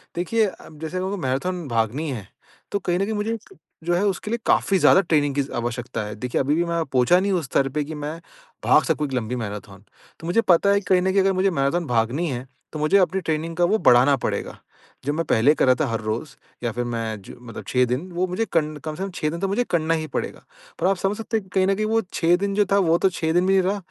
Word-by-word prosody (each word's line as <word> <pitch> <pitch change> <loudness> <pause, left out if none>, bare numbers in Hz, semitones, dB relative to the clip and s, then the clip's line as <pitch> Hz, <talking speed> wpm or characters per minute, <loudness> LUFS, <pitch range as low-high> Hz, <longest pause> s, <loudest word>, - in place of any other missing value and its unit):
देखिए 215 +6 +1
अब 160 -5 -11
जैसे 170 +3 -3
मेरे 190 +1 -2
को 205 - -2
मैराथन 150 +6 -2
भागनी 120 +6 -1
है, 105 -7 -6 0.4
तो 200 - 0
कहीं 180 -1 -1
न - - +2
कहीं 220 - -3
मुझे 220 +2 -1 0.5
जो 175 +1 0
है 185 - +1
उसके 205 +2 -2
लिए 235 - -1
काफ़ी 195 - +3
ज़्यादा 190 - +6
ट्रेनिंग 145 -5 +1
की 140 - +2
ज़ 140 - -6
आवश्यकता 120 -1 -3
है। 105 - -6
देखिए 125 +3 -1
अभी 145 +3 +1
भी 170 - +2
मैं 170 -1 0
पहुँचा 130 +6 +3
नहीं 200 +1 0
उस 175 -6 0
स्तर 135 0 +1
पे - - +1
कि 155 +2 -7
मैं 150 +2 -5 0.5
भाग - - +5
सकूँ 150 - 0
एक 135 - -8
लंबी 125 -1 -2
मैराथन 100 -3 -7 0.4
तो 165 - -8
मुझे 180 +6 +3
पता 190 -1 +4
है 200 - +4
कि 200 - -15
कहीं 180 -1 +5
न 190 +1 +1
कहीं 195 0 +3
अगर 195 0 +2
मुझे 190 +1 +2
मैराथन 165 +2 0
भागनी 120 +8 0
है 125 0 -5 0.3
तो 155 - -4
मुझे 155 +6 +3
अपनी 190 0 +2
ट्रेनिंग 165 0 -2
का 175 - +4
वो 215 +5 +2
बढ़ाना 125 +3 +6
पड़ेगा। - - -3 0.5
जो 145 - 0
मैं 165 +2 -1
पहले 120 +7 +4
कर - - +2
रहा 130 - +5
था 155 - +2
हर 115 -1 -2
रोज़ 115 +6 -4 0.3
या 120 - 0
फिर 120 0 -2
मैं 115 -3 -3
जो - - -12
मतलब 120 -2 -9
6 125 0 +3
दिन 125 +2 -1
वो 175 +2 0
कं 165 -8 0
कम 155 +1 -6
से 190 - -4
कम 195 - -3
6 155 - -1
दिन 170 +2 -5
तो 195 - 0
मुझे 205 +6 +1
करना 165 -1 +1
ही 155 -1 -2
पड़ेगा। - - -4 0.4
पर - - +2
आप 195 - +2
समझ 195 +3 -1
सकते 225 0 -2
हैं 210 - -4
कि 190 - -21
कहीं 190 0 +3
न 195 - +2
कहीं 215 +2 -1
वो 225 +1 +2
6 170 +1 +3
दिन 200 +1 -2
जो 205 -1 +3
था 200 - +5
वो 165 - +4
तो - - +6
6 160 -2 -2
दिन 180 +1 +3
भी 195 - +3
नहीं 190 -1 +4
रहा, 195 +3 0
165 Hz, 275 wpm, -23 LUFS, 130-190 Hz, 0.5 s, ज़्यादा